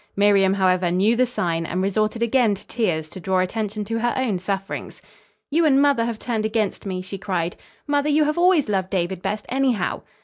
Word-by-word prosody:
Miriam, 195 -1 +4
however, 185 -2 +2
knew 195 +6 +2
the 255 +1 +2
sign 170 -8 -1
and 175 +2 -3
resorted 215 +3 0
again 235 -3 +2
to 195 - -14
tears 175 -10 -1
to 185 - -9
draw 190 +1 0
attention 210 +3 -2
to 225 +2 -2
her 240 +1 0
own 235 -8 0
sufferings. 195 +1 -4 0.5
"You 330 +3 +3
and 280 -4 +4
mother 280 -5 +3
have 235 -2 -3
turned 225 -1 -2
against 215 -2 -1
me," 185 -1 -3
she 195 +1 -7
cried. 175 -3 -2 0.3
"Mother, 290 0 +1
you 300 +1 +4
have 300 +3 0
always 350 -6 +4
loved 190 -3 -1
David 185 -1 -2
best, 210 +2 -3
anyhow." 255 -7 0
210 Hz, 200 wpm, -22 LUFS, 185-240 Hz, 0.5 s, Miriam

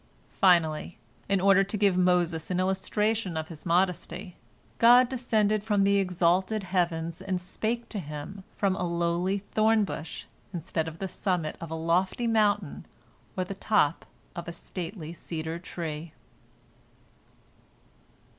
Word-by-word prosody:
Finally, 170 -3 +3 0.3
in 195 -1 +3
order 195 +1 +5
to 200 +2 -4
give 200 -2 +3
Moses 175 -3 +2
an 180 -1 0
illustration 190 +1 0
of 160 0 -4
His 165 0 -8
modesty, 180 +1 0 0.4
God 245 +2 +7
descended 220 -5 +1
from 205 -2 +2
the 200 0 +4
exalted 185 +2 +1
heavens 170 -3 -1
and 185 -2 -2
spake 220 +6 -3
to 210 - -4
him 150 +4 -7
from 195 -2 +1
a 185 - -3
lowly 170 +2 0
thorn 215 +2 +2
bush 165 -5 -6 0.3
instead 165 -1 -2
of 160 0 -7
the 195 - -3
summit 180 -4 -2
of 165 - -6
a 160 - -3
lofty 175 +8 0
mountain 210 -6 +1 0.5
or 185 - +1
the 185 - -5
top 195 -6 +1 0.3
of 170 -1 -6
a 170 - -5
stately 170 -1 -7
cedar 160 -1 -5
tree. 165 -2 -6
185 Hz, 135 wpm, -28 LUFS, 170-200 Hz, 0.5 s, God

